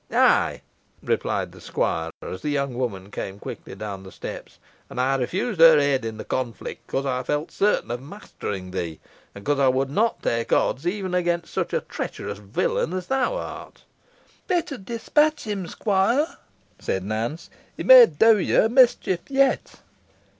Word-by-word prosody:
"Ay," - - +3 0.4
replied - - -1
the - - -15
squire, 80 0 -1
as 95 - -6
the 150 - -2
young 140 -2 -1
woman 105 -6 -4
came 95 -1 -5
quickly 100 - -8
down 100 -1 -6
the 95 0 -12
steps, - - -8 0.3
"and - - -6
I 130 +2 +2
refused 180 - -2
her 165 -1 +9
aid 140 -3 +2
in 110 -1 -5
the - - -6
conflict 120 -5 -4
because 135 +1 -2
I 125 -2 -1
felt 150 +5 -2
certain 205 - +1
of 120 +1 -3
mastering 105 - -7
thee, 85 -4 -4 0.4
and 100 - -10
because 145 +3 0
I 135 - +4
would 130 +1 +1
not 225 +9 0
take 115 0 -1
odds 140 +7 +1
even 190 0 -2
against 175 -1 -1
such - - -1
a - - 0
treacherous - - -6
villain 105 - -1
as 185 -1 -3
thou 265 - 0
art." - - -8 0.6
"Better 345 -6 -1
dispatch 295 +9 +1
him, 200 -5 -4
squire," 210 - +1 0.5
said 95 - -2
Nance; 115 - -4 0.3
"he - - -4
may - - +10
do 225 - +4
yo 190 - +3
a - - +1
mischief 240 -7 +4
yet." 270 -1 +1
145 Hz, 170 wpm, -24 LUFS, -, 0.6 s, may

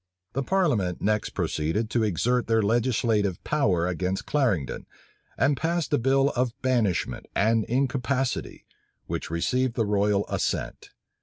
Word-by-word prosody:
The 135 - -1
parliament 130 - +1
next 105 0 0
proceeded 100 +9 -1
to 120 - +1
exert 120 +5 +1
their 115 -1 +2
legislative 110 -4 +1
power 100 - +1
against 90 +1 -2
Clarendon, 115 - 0 0.5
and 140 +3 +3
passed 165 +1 -1
a 145 - +4
bill 135 +3 +3
of 125 -3 -2
banishment 110 - 0
and 110 +1 +2
incapacity, 130 0 -1 0.4
which - - -4
received 125 +9 0
the 115 - +1
royal 105 0 +1
assent. - - -3
115 Hz, 130 wpm, -26 LUFS, 100-130 Hz, 0.5 s, a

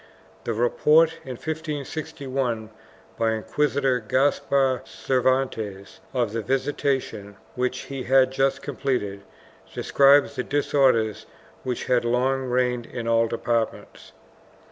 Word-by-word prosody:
The 115 - -1
report, 155 +7 +3
in 130 - -5
1561, 140 -6 -4 0.5
by 115 -1 +2
Inquisitor 135 +3 0
Gaspar 130 +2 +1
Cervantes 125 -7 -1
of 120 -5 -1
the 115 - -1
visitation 130 -5 -2 0.2
which 125 0 -2
he 135 -1 -6
had 130 0 +4
just 135 0 0
completed, 125 -8 -2 0.5
describes 140 +1 +4
the 125 - -1
disorders 130 -7 +1 0.3
which 125 -2 -3
had 125 -2 +2
long 130 +3 +1
reigned 125 -1 0
in 120 -2 -6
all 115 0 +3
departments. 115 0 -3
130 Hz, 105 wpm, -24 LUFS, 115-135 Hz, 0.5 s, had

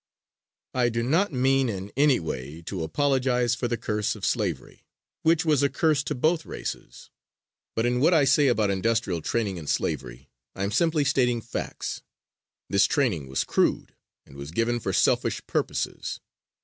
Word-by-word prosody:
I 125 -2 +2
do 115 0 -1
not 165 +10 +2
mean 135 0 +2
in 100 -1 -5
any 140 -1 +4
way 80 0 -6
to 90 +1 -5
apologize 125 - +1
for 120 0 -1
the 120 - -1
curse 105 -1 -1
of 100 -4 -5
slavery, 95 - -2 0.4
which 165 0 +3
was 150 -4 +3
a 140 - +3
curse 155 -2 +2
to - - -2
both 155 +5 +1
races, - - -7 0.6
but 115 - +1
in 125 0 +1
what 155 +6 +4
I 160 -5 +5
say 140 +2 +4
about 110 -5 +2
industrial 100 -3 0
training 105 0 -1
in 80 -3 -8
slavery - - -3 0.2
I 95 - -3
am 100 - -1
simply 160 +4 +2
stating 125 -4 +2
facts. 115 +1 -5 0.7
This 100 0 +3
training 110 - 0
was 65 +1 -1
crude, - - 0 0.3
and - - -16
was 70 +1 -7
given 115 +7 0
for - - -2
selfish - - +1
purposes. - - -2
120 Hz, 165 wpm, -26 LUFS, 95-135 Hz, 0.7 s, I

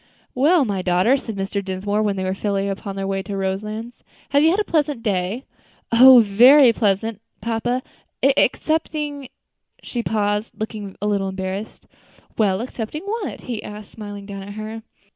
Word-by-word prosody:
"Well, 295 +4 +4
my 200 -4 -2
daughter," 180 +7 +3
said 230 -5 -5
Mr. 200 +1 -3
Dinsmore, 195 +2 -2
when 205 -2 0
they 190 - -3
were 185 0 -1
fairly 200 0 -1
upon 195 0 -4
their 195 0 -3
way 195 0 -1
to 195 +1 -5
Roselands, 210 +5 -4 0.3
"have 285 +1 +3
you 315 - +5
had 370 +5 +2
a - - +2
pleasant 295 - 0
day?" 200 +3 -1 0.5
"Oh! 250 +1 +9
very 245 +5 +7
pleasant, 210 0 0 0.2
papa, 240 +2 -1 0.4
excepting 290 0 +1 0.3
" - - -37
She 240 - -3
paused, 210 -1 -1
looking 215 -3 -5
a - - 0
little 200 -2 0
embarrassed. 190 +3 -5 0.5
"Well, 200 -2 +1
excepting 250 +5 -5
what?" 420 0 -4
he 235 -5 -5
asked, 210 0 -9
smiling 205 -2 -8
down 200 -1 -7
at 200 +1 -8
her. 215 +1 -6
215 Hz, 165 wpm, -21 LUFS, 195-250 Hz, 0.5 s, Oh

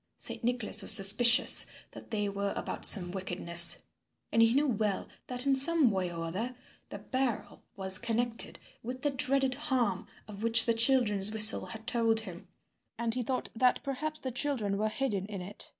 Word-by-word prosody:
Saint - - -6
Nicholas 245 -2 -2
was - - +1
suspicious 235 +4 +6 0.2
that - - -14
they 210 -2 -3
were 200 0 -5
about - - -3
some 180 -4 +6
wickedness, 175 -2 +2 0.5
and 230 - +1
he 230 +1 +2
knew 290 +2 +1
well 215 -6 -3 0.2
that 250 +1 -7
in 275 -1 +1
some 280 -1 +2
way 185 -3 -4
or 165 -1 -7
other 220 +10 -6 0.3
the - - -9
barrel 260 -4 -5
was 190 0 -3
connected 235 0 -3 0.2
with 255 +3 -9
the 290 - -1
dreaded 270 0 0
harm 255 -9 -3 0.2
of 205 -1 -12
which 230 0 +3
the 230 - 0
children's 225 -4 +3
whistle 220 0 +6
had 225 0 -11
told 225 -1 -1
him, 185 -3 -12 0.5
and 230 -1 -3
he 250 - -3
thought 255 +2 -5
that 250 +2 0
perhaps 305 +3 -6
the 260 - -7
children 245 -6 -1
were 215 +1 -2
hidden 215 -5 -4
in 205 -2 -8
it. 190 +3 -9
230 Hz, 180 wpm, -28 LUFS, 200-255 Hz, 0.5 s, suspicious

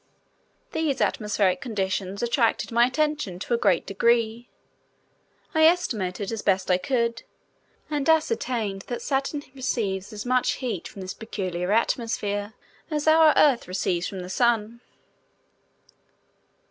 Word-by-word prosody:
These 315 -4 -1
atmospheric 210 0 +1
conditions 195 -4 -2
attracted 235 -1 +1
my 235 +1 +4
attention 300 - -1
to 205 - -3
a - - +3
great 175 - +2
degree. 230 +3 +1 1.0
I 315 -1 +5
estimated 215 - +1
as 225 -2 -3
best 190 -1 +1
I 180 - +3
could, 235 +2 -1 0.7
and 295 0 -1
ascertained 250 - +1
that 240 - -4
Saturn 275 +1 -1
receives 215 -7 -2
as 210 +1 -7
much 255 0 +2
heat 245 -9 -4
from 195 - -9
this 185 +1 -5
peculiar 185 -4 -4
atmosphere 210 -2 0 0.4
as 300 -1 -2
our 315 0 +7
Earth 275 -5 +4
receives 180 -1 -1
from 190 -2 -6
the 180 - -8
Sun. 235 0 +1
230 Hz, 125 wpm, -25 LUFS, 195-265 Hz, 1.0 s, our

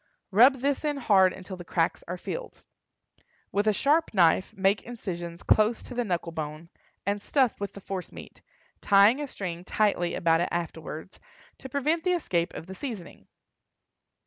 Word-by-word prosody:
Rub 245 +8 +7
this 280 +1 0
in 295 -1 -1
hard 195 -7 +4
until 185 0 -8
the 175 - -8
cracks 165 -1 0
are 180 +2 -4
filled. - - -7 0.9
With 205 +2 0
a - - +6
sharp 290 +5 +1
knife 180 +1 +4
make 195 +1 +2
incisions 175 -8 -6
close 215 +2 +3
to - - -9
the 245 0 0
knuckle 175 -5 -2
bone, 155 +1 -6 0.4
and 200 +1 -1
stuff 260 +1 +1
with 200 -1 -4
the 200 - -10
force 190 -1 -5
meat, - - -12 0.4
tying 205 +7 +5
a 290 - -3
string 175 -8 -6
tightly 185 -3 +1
about 165 0 +2
it - - 0
afterward, 165 0 -5 0.4
to 265 - -9
prevent 305 +5 0
the 365 - +2
escape 175 - 0
of - - -7
the 190 - -8
seasoning. 210 -5 -8
195 Hz, 170 wpm, -27 LUFS, 175-245 Hz, 0.9 s, Rub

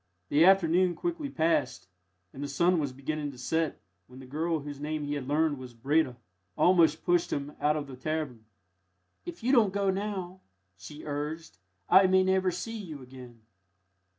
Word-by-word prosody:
The 150 +3 +4
afternoon 180 -1 +4
quickly 335 -4 -3
passed, 160 - 0 0.5
and 135 - -8
the 145 - -3
sun 170 +5 +2
was 145 -3 -2
beginning 145 +3 -4
to - - -14
set, 160 +5 -1 0.3
when 125 - -14
the 130 - -10
girl, 160 +4 -2
whose 145 -1 -8
name 150 +1 -3
he 145 0 -3
had 140 -3 -4
learned 150 -1 +1
was 125 -2 -10
Breda, 135 +1 +1 0.4
almost 165 -4 +4
pushed 175 -1 +2
him 145 +1 -3
out 150 +1 +2
of 150 - -3
the 135 -2 -10
cavern. 135 -5 -4 0.8
"If 345 -8 -8
you 250 - +2
don't 230 -7 +5
go 200 0 +1
now," 190 -2 -4 0.3
she 95 - -11
urged, 150 - -5 0.3
"I 190 0 +7
may 190 0 +4
never 190 0 +2
see 185 +6 -5
you 155 -9 -8
again." 125 -2 -13
155 Hz, 175 wpm, -29 LUFS, 140-185 Hz, 0.8 s, I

